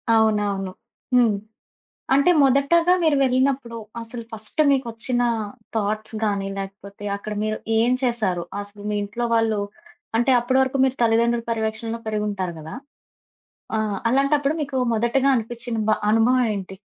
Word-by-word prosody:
అవునవును. 205 -3 +1 0.4
హ్మ్. 240 -3 +5 0.8
అంటే 280 +6 +5
మొదటగా 280 +6 +4
మీరు 315 -2 +4
వెళ్ళినప్పుడు 260 -2 +1 0.2
అసలు 230 +1 -7
ఫస్టు 220 +7 -2
మీకొచ్చిన 245 -2 0 0.5
థాట్స్ 215 +1 -2
గాని 200 -2 -1
లేకపోతే 200 +1 -8
అక్కడ 210 +1 -6
మీరు 215 0 -1 0.2
ఏం 230 +2 +3
చేశారు? 210 -8 0 0.2
అసలు 205 0 -12
మీ 210 - -1
ఇంట్లో 225 +4 -3
వాళ్ళు 225 -2 +2 0.6
అంటే 240 +3 +3
అప్పడి 250 +2 0
వరకు 265 +1 0
మీరు 265 0 +2
తల్లిదండ్రులు 235 +1 +2
పర్యవేక్షణలో 225 0 -2
పెరిగింటారు 205 -4 -2
కదా! 155 +6 -8 1.0
ఆహ్, 215 -2 -1
అలాంటప్పుడు 275 +2 +2
మీకు 280 -2 -3 0.2
మొదటిగా 240 +5 +2
అనిపించిన 235 0 -3
బ - - +5 0.2
అనుభవం 245 +3 +4
ఏంటి? 190 -1 -6
230 Hz, 130 wpm, -23 LUFS, 210-255 Hz, 1.0 s, హ్మ్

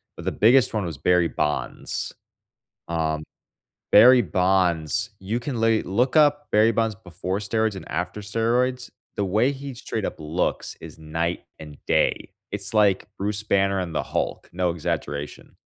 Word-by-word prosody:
but - - -10
the - - 0
biggest 120 +2 +4
one 105 -3 0
was 80 -5 -5
Barry 90 0 +3
Bonds. 75 -6 -3 0.7
Um, 80 -2 -1 0.7
Barry 125 +4 +8
Bonds, 90 +1 +1
you 100 +5 -2
can 125 -2 -4
lay 115 -1 +3
look 125 - 0
up 145 -1 +4
Barry 110 +2 +5
Bonds 115 -1 0
before 95 -1 -5
steroids 110 0 0
and 95 - -9
after 90 +5 -3
steroids. 120 +4 0 0.3
The 100 - 0
way 110 +8 +2
he 140 -1 -7
straight 110 -3 -4
up - - -4
looks 80 +3 -2
is - - -11
night 80 +2 -3
and 75 -2 -10
day. - - +1 0.2
It's 100 -1 -4
like 100 -3 +3
Bruce 105 +1 -2
Banner 100 -2 +1
and 85 -3 -5
the - - 0
Hulk, - - -3
no 90 0 0
exaggeration. 75 -3 -4
100 Hz, 155 wpm, -24 LUFS, 85-115 Hz, 0.7 s, Barry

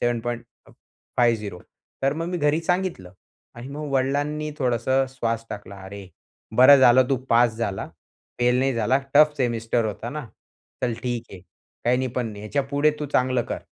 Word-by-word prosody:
7.50. 120 -3 -3 0.4
तर 135 +1 +2
मग 165 +2 -4
मी 180 - -2
घरी 150 +1 +2
सांगितलं 175 - -2 0.4
आणि 120 +3 -9
मग 150 +1 -6
वडिलांनी 145 +3 0
थोडंसं 130 +1 +1
श्वास 115 -3 -2
टाकला, 100 -1 -8
"अरे, 100 0 -9 0.5
बरं 130 +3 +9
झालं 130 0 +6
तू 135 - +3
पास 115 -1 +4
झाला, 100 -5 -3 0.5
फेल 125 +1 +3
नाही 135 0 +1
झाला 115 +4 +2 0.2
टफ 150 0 +6
सेमिस्टर 115 -2 0
होता 110 +3 -5
ना, 150 -3 -6 0.6
चल 120 -2 0
ठीक 120 -2 -2
आहे, 95 - -10 0.4
काही 120 +2 +3
नाही, 130 - -1
पण 125 -1 -2
नाही 105 -1 -9
ह्याच्यापुढे 140 +5 +1
तू 150 - -2
चांगलं 130 -1 +2
कर." - - -3
125 Hz, 155 wpm, -24 LUFS, 115-140 Hz, 0.6 s, बरं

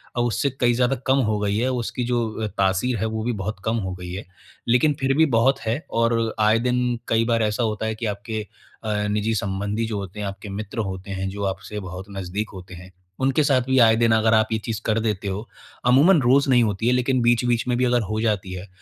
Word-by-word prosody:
और 120 - +1
उससे 140 +4 0
कई 120 -1 +3
ज़्यादा 125 +2 +2
कम 130 +1 +4
हो 105 - +1
गई 105 0 0
है, 125 +3 +1
उसकी 125 0 -3
जो 115 -3 -1
तासीर 100 +6 +1
है 110 - -1
वो 110 0 -3
भी 120 - 0
बहुत 105 +1 -4
कम 115 +1 +1
हो 95 -3 -3
गई 90 -1 -8
है, 95 +3 -6 0.4
लेकिन 125 +5 +3
फिर 135 0 +1
भी 160 - +6
बहुत 130 +4 +3
है, 115 +6 -2
और 115 -1 +1
आए 110 +1 +4
दिन 125 -1 0
कई 115 0 +2
बार 115 -1 +1
ऐसा 105 +3 0
होता 110 -1 -1
है 110 0 -2
कि 115 - -5
आपके 105 +2 -3 0.4
अ, 110 -1 -1
निजी 105 +2 0
संबंधी 100 +2 -2
जो 110 -2 -3
होते 100 +1 -7
हैं, 105 - -2
आपके 100 +1 -7
मित्र 105 +3 -5
होते 95 +1 -7
हैं, 95 0 -3
जो 100 +1 -5
आपसे 100 +2 -4
बहुत 95 0 -7
नज़दीक 95 +3 -3
होते 95 -1 -10
हैं, 90 +1 -11 0.3
उनके 135 +3 +2
साथ 135 -3 +3
भी 130 +1 0
आए 110 -1 +6
दिन 115 -1 +3
अगर 110 0 +3
आप 110 0 +4
ये - - +2
चीज़ 115 -1 -3
कर 110 0 +1
देते 105 -3 -2
हो, 100 +4 -4 0.4
अमूमन 145 +7 +5
रोज़ 135 +3 +3
नहीं 125 -2 +5
होती 110 +1 -1
है, 125 - +4
लेकिन 125 0 +1
बीच-बीच 120 0 +2
में 120 -1 +1
भी 125 - +2
अगर 120 -1 +2
हो 110 - -1
जाती 100 -5 -1
है, 90 +2 -7
110 Hz, 240 wpm, -23 LUFS, 100-120 Hz, 0.4 s, भी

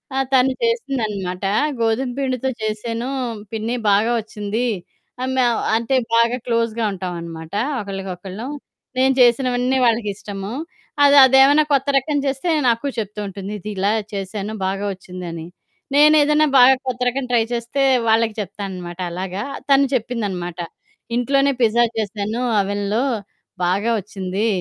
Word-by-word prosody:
ఆ! - - 0 0.2
తను 260 0 +5
చేసిందనమాట. 215 - -2 0.4
గోధుమ 230 +3 +1
పిండితో 265 -1 -1
చేసాను 230 +3 -3 0.4
పిన్న 220 0 -3 0.2
బాగా 210 +4 +3
ఒచ్చింది. 220 +2 -3 0.5
ఆ - - 0
మేమ 250 -2 +3 0.2
అంటే 235 +4 0 0.2
బాగా 235 +2 +3
క్లోజ్‌గా 230 -1 0
ఉంటాామనమాట. 170 -3 -6 0.3
ఒకళ్ళకొకళ్ళు. 195 +2 -6 0.5
నేను 265 +1 +4
చేసినవన్నీ 250 +1 +3
వాళ్ళకి 225 -3 +2
ఇష్టము. 200 +1 -6 0.5
అది 285 0 +6
అదేమైనా 270 +3 +6
కొత్త 275 +1 +2
రకం 290 +2 0
చేస్తే 275 +5 -1 0.2
నాకు 235 +4 0
చెప్తూ 210 -1 -4
ఉంటుంది. 195 +1 -7
ఇది 210 - -7
ఇలా 195 +2 +2 0.2
చేసాను 200 +2 -4
బాగా 195 +2 -2
ఒచ్చిందని. 180 -3 -8 0.5
నేనేదైనా 300 0 +5
బాగా 260 +2 +8
కొత్తరకం 250 +1 -1
ట్రై 235 - +4
చేస్తే 235 +4 -2 0.3
వాళ్ళకి 225 0 +3
చెప్తాననమాట 190 -3 -6
అలాగా, 185 +3 -4 0.3
తను 275 0 +5
చెప్పిందనమాట. 200 -8 -2 0.6
ఇంట్లోనే 275 +3 +2
పిజ్జా 235 +1 +4
చేసాను. 215 +2 -2 0.2
ఓవెన్‌లో. 205 +3 0 0.6
బాగా 200 +6 +1
వచ్చింది. 195 +1 -3
225 Hz, 120 wpm, -20 LUFS, 195-255 Hz, 0.6 s, బాగా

